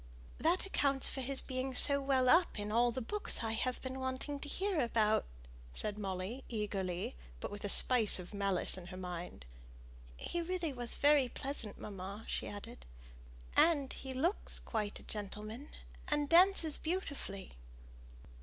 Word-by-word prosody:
"That 345 +4 +1
accounts 275 -8 +2
for 265 - -5
his 270 +1 +2
being 260 0 -4
so 280 +2 +8
well 265 -2 +1
up 335 +3 +4
in 205 0 -4
all 240 +2 +3
the 255 +1 -5
books 415 - -1
I've 225 +3 -2
been 260 0 -5
wanting 260 +2 -4
to 290 - -7
hear 380 -1 -1
about," 220 -3 +1 0.5
said 210 0 -3
Molly, 195 +6 -5
eagerly, 195 - -3 0.2
but - - -6
with 205 - -6
a 205 - -3
spice 230 0 +7
of 180 +2 -8
malice 195 -2 +3
in 175 - -11
her 185 - -9
mind. 180 - -7 0.7
"He 345 - -3
really 340 -3 -3
was 240 -2 -2
very 285 -3 +3
pleasant, 260 -5 -5
mamma," 200 +2 -8
she - - -3
added; 200 - -10 0.7
"and 290 -5 +3
he 265 - -7
looks 320 +10 -2
quite 210 -3 -4
a - - -15
gentleman, 215 +6 -7 0.4
and 295 -1 0
dances 340 -1 +4
beautifully!" 285 - -5
255 Hz, 155 wpm, -34 LUFS, 205-285 Hz, 0.7 s, so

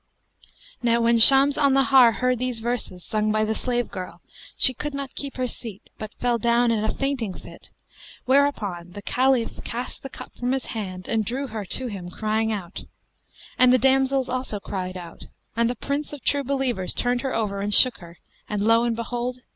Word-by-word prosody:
Now 235 -1 +2
when 230 0 +3
Shams 275 +5 +8
al 285 -2 +4
Nahar 270 -3 +5
heard 250 +3 0
these 250 -2 -3
verses 225 -6 -4
sung 215 0 -1
by 215 0 +1
the 220 - -1
slave 245 0 -2
girl, 185 -1 -8 0.4
she 260 - +5
could 295 +3 -5
not 275 -1 -6
keep 280 -1 -7
her 255 0 -1
seat; 225 -4 -8 0.2
but 215 -1 -7
fell 240 -1 -1
down 235 +1 +2
in 215 -2 0
a 220 - 0
fainting 265 -9 -3
fit - - -14 0.6
whereupon 210 -11 0
the 205 - -9
Caliph 255 -2 0
cast 245 +2 -5
the 270 - -8
cup - - -11
from 245 +1 -2
his 265 - -2
hand 185 -4 -6
and 225 -1 0
drew 250 +7 -3
her 220 -5 -6
to 255 +7 -1
him 195 -7 -6
crying 220 +3 -1
out; 195 -4 -6 0.8
and 255 -1 +6
the 255 - +5
damsels 265 +1 +2
also 255 -5 -3
cried 185 -2 -5
out, 170 -2 -11 0.3
and 230 +1 +1
the 245 - -3
Prince 280 +5 -4
of 290 - -9
True 285 0 +1
Believers 260 -8 -2
turned 245 0 0
her 265 -1 -3
over 200 -3 -2
and 205 +1 -2
shook 250 +3 +6
her, 170 -1 -13 0.3
and 210 -1 -2
lo 230 +1 +4
and 235 -1 0
behold! 245 +2 -4
235 Hz, 195 wpm, -23 LUFS, 215-260 Hz, 0.8 s, Shams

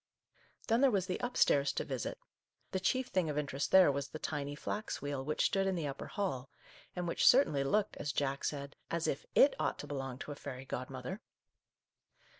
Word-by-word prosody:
Then 230 +2 +3
there 275 - +6
was 195 -6 +1
the 185 -1 -3
up 245 0 -3
stairs 140 0 +4
to - - -1
visit. 130 -4 -4 0.5
The 190 - 0
chief 255 +7 0
thing 180 -4 +1
of 150 - -2
interest 145 -1 -1
there 190 -6 +8
was 140 0 -2
the 155 - -7
tiny 145 -1 -3
flax 210 +8 -4
wheel 145 -2 -3
which 150 +2 0
stood 195 -1 +2
in 190 - +1
the 165 -3 -2
upper 140 -1 -5
hall, 135 -11 -3 0.5
and 180 -1 -2
which 170 - +2
certainly 200 - +6
looked, 205 +9 +1
as 145 - -2
Jack 140 -1 -1
said, 140 -1 -3
as 170 -1 -1
if 135 - -2
it 280 - +7
ought - - 0
to - - -7
belong 135 -3 -4
to 145 - -7
a - - -5
fairy 135 -2 -7
godmother. 130 - -5
145 Hz, 205 wpm, -34 LUFS, 140-190 Hz, 0.5 s, there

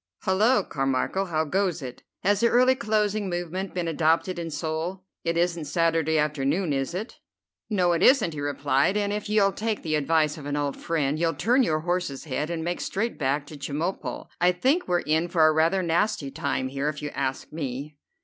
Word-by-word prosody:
"Hullo, 215 +7 +3
Carmichel, 135 +8 -1
how 160 -2 0
goes 180 -1 0
it? 125 -1 -8 0.2
Has 205 +1 +3
the 235 - +4
early 255 +2 +5
closing 210 -4 0
movement 175 +2 -4
been 175 -2 -1
adopted 165 +3 +1
in 165 -1 -4
Seoul? 165 +4 -3 0.2
It 165 0 0
isn't 170 -2 0
Saturday 165 0 +1
afternoon, 150 +3 0
is 135 +5 -2
it?" 215 +6 -6 0.5
"No, 185 -5 +2
it 170 - +1
isn't," 235 - +5
he 145 - -5
replied, 145 +5 +1
"and 205 -1 0
if 210 0 -4
you'll 205 -2 +4
take 220 +1 -3
the 155 - -2
advice 155 +1 +1
of 145 - -8
an 145 - -2
old 145 -1 -1
friend, 155 -2 -1
you'll 165 -1 +1
turn 245 +7 +3
your 155 -10 +1
horse's 175 -5 -2
head, 150 +1 -3
and 165 -2 -3
make 175 +1 -2
straight 230 +4 -2
back 140 +1 0
for 150 - -9
Chemulpo. 150 +6 -3
I 180 +1 +4
think 265 - +1
we're 175 -1 +2
in 160 +3 +1
for 170 -2 +3
a 155 - +5
rather 165 +4 +2
nasty 170 -3 0
time 140 -3 -2
here, 140 +2 -1
if 150 0 -6
you 145 - -3
ask 135 +1 -3
me." 145 -1 -5
165 Hz, 195 wpm, -26 LUFS, 150-190 Hz, 0.5 s, early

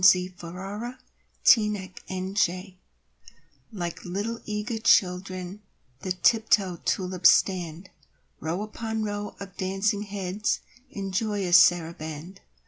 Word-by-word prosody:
XXXVIII 185 -1 +6 1.1
The 210 -5 +4 0.2
Dance 185 0 +1 1.2
Like 175 -6 -5
little, 205 +6 -3
eager 210 +2 -3
children 185 -1 +2 0.4
The 185 - -4
tiptoe 200 -2 +3
tulips 185 -1 +3
stand, 180 -1 +1 0.5
Row 170 +6 -2
upon 220 +1 -3
row 205 0 -4
of 195 -1 -9
dancing 195 +2 0
heads 200 0 -2 0.3
In 195 -4 -5
joyous 195 -3 +3
saraband. 170 -1 +1
190 Hz, 95 wpm, -26 LUFS, 180-210 Hz, 1.2 s, XXXVIII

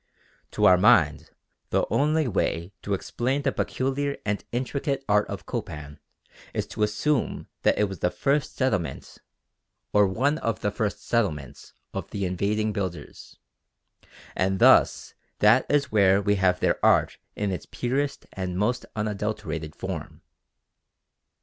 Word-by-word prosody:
To 105 - +2
our 90 -2 +7
mind 90 -8 +4 0.4
the - - +1
only 155 +1 +2
way 95 -3 -1
to 100 - -1
explain 130 +8 -2
the 135 - +2
peculiar 140 +3 -2
and 105 -1 -1
intricate 135 +2 -2
art 105 0 +3
of - - -7
Copan 75 -1 -6 0.6
is - - -1
to - - -5
assume 110 +6 0 0.2
that - - +3
it - - +3
was 95 -4 -3
the 90 - +1
first 140 +8 0
settlement 110 - -2 0.7
or 105 -1 +5
one 135 +11 0
of 115 -2 -2
the 105 - 0
first 105 -1 -3
settlements 75 - -2 0.2
of - - -5
the 100 -1 -3
invading 105 +4 0
builders, 90 -7 -6 1.0
and 95 +1 +1
thus - - +4 0.2
that 110 +5 +4
it - - +3
is 140 -1 0
where 100 -2 +5
we 100 0 +1
have 95 -2 +2
their - - +1
art - - +3 0.2
in 105 -1 -1
its 90 - -5
purest 135 +3 -2
and 90 -2 -4
most 115 +6 0
unadulterated 105 -7 -3
form. - - -6
105 Hz, 145 wpm, -26 LUFS, 95-130 Hz, 1.0 s, our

